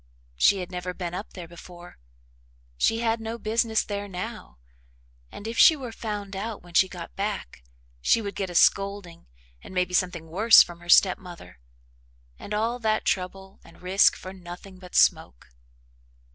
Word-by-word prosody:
She 190 - +3
had 180 - -7
never 180 0 -5
been 175 -2 -5
up 195 +4 -7
there 175 -3 -9
before. 175 - -13 0.8
She 225 - +1
had 225 -1 0
no 225 +1 -5
business 225 0 0
there 205 -1 -5
now, 180 - -7 0.7
and, 205 - -9
if 230 - -4
she 320 - +8
were 260 -5 -7
found 205 -3 -6
out 210 +1 -5
when 175 -1 -16
she 190 +2 +4
got 175 -2 -9
back, 200 - -4 0.4
she 230 - +3
would 200 -2 -5
get 195 -2 -4
a 175 - -8
scolding 195 -2 +1 0.3
and 190 - -12
maybe 180 0 0
something 180 -3 0
worse 215 +8 +7
from 175 -1 -12
her 175 0 -15
step 185 +1 +6
mother 170 - -12 0.8
and - - -10
all 225 +4 -1
that 220 -2 0
trouble 190 +1 -3
and - - -18
risk 190 +2 +4
for 185 - -9
nothing 185 +1 -11
but 180 -1 -12
smoke. - - +2
190 Hz, 170 wpm, -25 LUFS, 175-215 Hz, 0.8 s, she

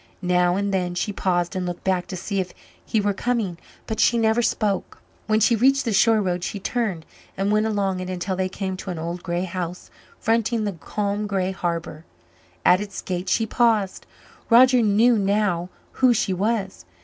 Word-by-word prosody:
Now 180 0 +2
and 200 0 -1
then 180 -2 -1
she 205 +3 -2
paused 175 -2 0
and 185 - -1
looked 175 -1 -5
back 185 -2 0
to 185 - -5
see 195 +2 -3
if 180 -1 -4 0.3
he 220 - 0
were 205 0 +1
coming, 210 -6 -2 0.3
but 220 - -4
she 235 - +4
never 225 +1 +2
spoke. 210 -4 -1 0.3
When 215 0 +3
she 230 +2 +4
reached 270 +4 +3
the 230 - 0
shore 220 +2 +4
road 180 -1 -1
she 205 - -3
turned 195 -6 -2 0.3
and 195 +2 0
went 215 +1 +2
along 200 -3 -1
it 185 0 -5
until 185 +1 -3
they 185 0 -1
came 190 0 -4
to 190 - -7
an 175 - -4
old 170 +2 -4
grey 175 -1 -2
house 180 -1 -5 0.3
fronting 225 0 +1
the 205 - -1
calm 205 +5 -3
grey 190 -2 -1
harbour. 170 -3 -4 0.6
At 180 +2 +5
its 200 -1 -6
gate 180 0 -3
she 225 - +2
paused. 220 -4 +1 0.4
Roger 250 +1 +6
knew 220 +2 +4
now 195 -3 0 0.2
who 255 -2 +3
she 195 - 0
was. 200 +1 -2
195 Hz, 190 wpm, -23 LUFS, 180-220 Hz, 0.6 s, Roger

